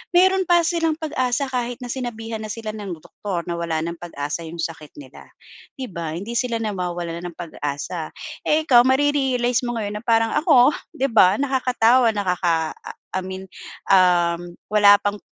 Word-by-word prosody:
meron 375 +1 +4
pa 345 -1 +5
silang 330 -1 +1
pag-asa 280 -4 -1
kahit 245 -1 -2
na 245 - -7
sinabihan 230 -3 -5
na 215 - -5
sila 215 0 -5
ng 205 -4 -6
doktor 185 -1 -5
na 170 - -2
wala 165 -2 -1
nang 170 0 -4
pag-asa 165 -1 -5
'yong 165 +1 -6
sakit 160 -3 -7
nila. 135 -2 -13 0.5
'Di 260 -2 -6
ba, 165 -3 -4
hindi 225 +7 -4
sila 250 -2 -1
nawawalan 175 -4 -4
ng 170 - -10
pag-asa. 155 0 -5 0.3
Eh, 310 +1 +2
ikaw, 245 -5 +6
mare-realize 265 -3 +2
mo 240 - -2
ngayon 210 -2 -3
na - - -16
parang, 225 -1 +3
ako, 295 -4 +5 0.2
'di 270 +1 0
ba, 195 -3 +6
nakakatawa, 255 -3 +3
nakaka 175 -5 0 0.4
I - - +1
mean, 190 0 -6 0.5
uhm. 175 -2 +3 0.2
wala 205 -1 +7
pang 205 0 -1
215 Hz, 165 wpm, -22 LUFS, 175-255 Hz, 0.5 s, wala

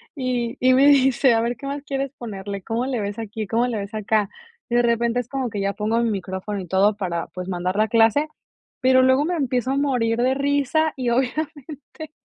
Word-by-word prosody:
y 250 -3 -2
y 255 +1 +4
me 270 +2 +5
dice: 270 -2 +5
"A 225 - +2
ver 235 +1 -1
qué 275 - -10
más 280 +1 -4
quieres 275 -1 -3
ponerle, 200 -3 -6
cómo 230 +5 -2
le 260 -3 -2
ves 205 +1 -4
aquí, 220 -1 -5
cómo 230 +4 +1
le 240 -3 -2
ves 200 +1 -6
acá". 215 -1 0 0.4
Y 240 - 0
de 240 - +4
repente 235 0 +1
es 245 - -4
como 265 -2 -3
que 205 -2 -4
ya 200 0 -1
pongo 215 +2 -1
mi 230 - +1
micrófono 190 +1 -4
y 180 - -9
todo 195 +4 +3
para, 175 -5 -3
pues, 180 0 -7
mandar 180 0 -2
la 215 +1 +3
clase, 230 +7 +3 0.5
pero 260 0 +5
luego 260 +3 +3
me 355 +2 -1
empiezo 260 -4 -1
a 275 - 0
morir 245 -5 0
de 255 +1 +2
risa 285 +3 +1
y, 255 -2 -2
obviamente, 295 +4 -4
240 Hz, 220 wpm, -22 LUFS, 210-270 Hz, 0.5 s, me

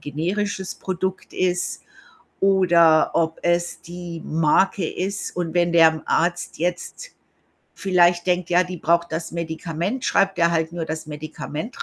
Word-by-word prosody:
generisches 190 +6 -3
Produkt 190 0 -4
ist 180 -1 -1 0.6
oder 175 -5 +4
ob 160 -1 0
es 175 0 0
die 175 -1 -8
Marke 165 +4 +2
ist. 195 +2 -4
Und 175 -2 -3
wenn 175 -1 +2
der 160 -2 +5
Arzt 175 +1 0
jetzt 180 - -4 0.6
vielleicht 175 -2 +2
denkt, 180 -1 0
ja, 180 +1 +4
die 180 -1 -7
braucht 170 +1 +1
das 165 +1 -3
Medikament, 170 +7 -3
schreibt 195 -1 +2
er 170 0 +4
halt 165 -1 0
nur 170 -1 -3
das 160 0 -5
Medikament 155 - -6
175 Hz, 135 wpm, -22 LUFS, 165-185 Hz, 0.6 s, der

